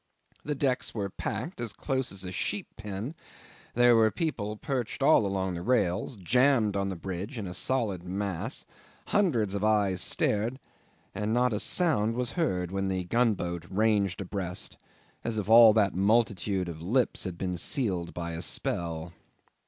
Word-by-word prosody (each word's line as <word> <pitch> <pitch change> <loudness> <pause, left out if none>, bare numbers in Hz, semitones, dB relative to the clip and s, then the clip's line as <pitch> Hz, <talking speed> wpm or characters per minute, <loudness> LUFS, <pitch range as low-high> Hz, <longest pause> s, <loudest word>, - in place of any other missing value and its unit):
The 150 - -2
decks 130 -4 0
were 100 -3 -2
packed 125 - -4
as 115 -3 -3
close 130 -2 -2
as 95 -1 -5
a 90 - -5
sheep 100 +2 -2
pen: 105 +5 -5 0.6
there 120 0 +6
were 110 -1 +5
people 110 - -3
perched 130 +1 -3
all 135 -8 +5
along 95 -1 -1
the 85 - -4
rails, 105 0 0
jammed 115 +2 +3
on 100 0 0
the 95 - -3
bridge 95 - -5
in 105 - -4
a 90 - -5
solid 110 -6 0
mass; 95 -1 -3 0.4
hundreds 130 - +2
of 100 0 -2
eyes 105 -4 +2
stared, 110 +5 +1 0.6
and 105 +3 -1
not 125 -1 +2
a 105 - 0
sound 115 - +2
was 125 -1 -1
heard 90 - -1
when 95 0 -1
the 95 -1 -1
gunboat 90 -5 0
ranged 100 -1 +1
abreast, 90 -1 -4 0.5
as 115 -1 -2
if 105 - -2
all 115 0 +9
that 105 -3 +3
multitude 100 -2 +1
of 80 -2 -7
lips 120 +8 +1
had 90 -3 -5
been 90 -1 -2
sealed 90 -3 -1
by 85 -1 -5
a 85 0 -5
spell. 85 0 -3
105 Hz, 165 wpm, -28 LUFS, 95-120 Hz, 0.6 s, all